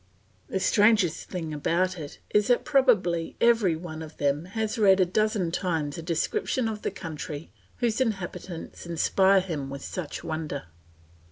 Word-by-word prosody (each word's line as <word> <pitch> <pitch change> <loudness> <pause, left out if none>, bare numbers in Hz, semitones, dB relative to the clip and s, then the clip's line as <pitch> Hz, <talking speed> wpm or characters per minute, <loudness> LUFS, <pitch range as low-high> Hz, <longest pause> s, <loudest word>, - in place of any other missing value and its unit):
The 190 - -1
strangest 205 -4 +3
thing 165 -4 -4
about 175 +4 0
it 145 -2 -8
is 210 -1 +3
that 245 - +3
probably 225 - +2
every 230 -8 +4
one 160 -1 -7
of 160 -1 -9
them 145 +3 0
has 220 +1 -1
read 195 -2 +6
a 185 - +5
dozen 200 -1 0
times 165 -6 -1
a - - -5
description 170 +8 0
of 215 -1 -4
the - - -1
country 160 -4 -7 0.3
whose 235 0 0
inhabitants 190 -7 -4
inspire 190 +3 +3
him 155 -7 -4
with 140 0 -7
such 175 -6 -5
wonder. 155 -3 -4
180 Hz, 155 wpm, -27 LUFS, 160-210 Hz, 0.3 s, read